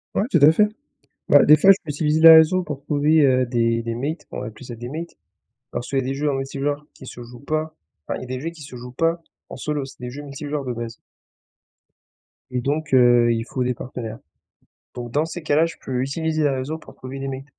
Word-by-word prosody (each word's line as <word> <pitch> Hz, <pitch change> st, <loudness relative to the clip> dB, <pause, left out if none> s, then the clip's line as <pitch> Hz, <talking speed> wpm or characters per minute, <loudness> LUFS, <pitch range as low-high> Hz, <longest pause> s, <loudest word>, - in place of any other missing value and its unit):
Ouais, -, -, +2 dB
tout -, -, +4 dB
à 145 Hz, +2 st, +8 dB
fait. 210 Hz, +6 st, +3 dB, 0.6 s
Bah, -, -, +7 dB
des 155 Hz, -, +8 dB
fois 190 Hz, +6 st, +5 dB
je 195 Hz, -, +8 dB
peux 150 Hz, -, -6 dB
utiliser 150 Hz, +1 st, 0 dB
les 165 Hz, 0 st, +10 dB
réseaux 160 Hz, +3 st, +5 dB
pour 150 Hz, -4 st, -6 dB
trouver, 150 Hz, +1 st, +2 dB
heu, 130 Hz, -1 st, +3 dB
des 115 Hz, -1 st, +1 dB
des 115 Hz, 0 st, -3 dB
mates, 145 Hz, +8 st, -4 dB
on -, -, -5 dB
va -, -, -5 dB
appeler 110 Hz, +3 st, -10 dB
ça 120 Hz, -, -7 dB
des 120 Hz, +1 st, -8 dB
mates, 165 Hz, +5 st, -7 dB, 0.5 s
parce 120 Hz, -, -5 dB
qu'il 135 Hz, -, 0 dB
y -, -, +3 dB
a -, -, -7 dB
des 135 Hz, +1 st, -2 dB
jeux 150 Hz, +2 st, -1 dB
en 140 Hz, -, -1 dB
multi-joueurs 140 Hz, +2 st, -3 dB
qui 130 Hz, -, -13 dB
se 120 Hz, -, -9 dB
jouent 120 Hz, +1 st, -12 dB
pas 155 Hz, +2 st, -3 dB, 0.3 s
enfin, -, -, -2 dB
il -, -, -8 dB
y -, -, -5 dB
a -, -, -9 dB
des 130 Hz, 0 st, -5 dB
jeux 165 Hz, -, -3 dB
qui 165 Hz, -3 st, -13 dB
se 135 Hz, -, -11 dB
jouent 125 Hz, +1 st, -9 dB
pas 165 Hz, +5 st, 0 dB, 0.3 s
en -, -, -8 dB
solo, 150 Hz, -2 st, -3 dB
c'est 135 Hz, -, -13 dB
des 125 Hz, 0 st, -5 dB
jeux 145 Hz, +4 st, -8 dB
multi-joueurs 145 Hz, 0 st, -5 dB
de 125 Hz, -, -3 dB
base 120 Hz, -1 st, -6 dB, 1.6 s
et 125 Hz, -1 st, -1 dB
donc 145 Hz, +2 st, -2 dB
heu, 120 Hz, -2 st, +5 dB
il 115 Hz, 0 st, -1 dB
faut 125 Hz, +2 st, -3 dB
des 125 Hz, 0 st, 0 dB
partenaires, 115 Hz, -3 st, -7 dB, 0.8 s
donc 120 Hz, -1 st, -7 dB
dans 150 Hz, +5 st, +1 dB
ces 170 Hz, +2 st, -7 dB
cas-là 155 Hz, +2 st, +3 dB
je 165 Hz, -, -6 dB
peux 125 Hz, -1 st, -2 dB
utiliser 155 Hz, +3 st, -1 dB
les 145 Hz, -, +3 dB
réseaux 135 Hz, +4 st, -3 dB
pour 160 Hz, -, -15 dB
trouver 130 Hz, +1 st, -8 dB
des 135 Hz, -, -4 dB
mates. 135 Hz, 0 st, -6 dB
135 Hz, 250 wpm, -22 LUFS, 125-155 Hz, 1.6 s, les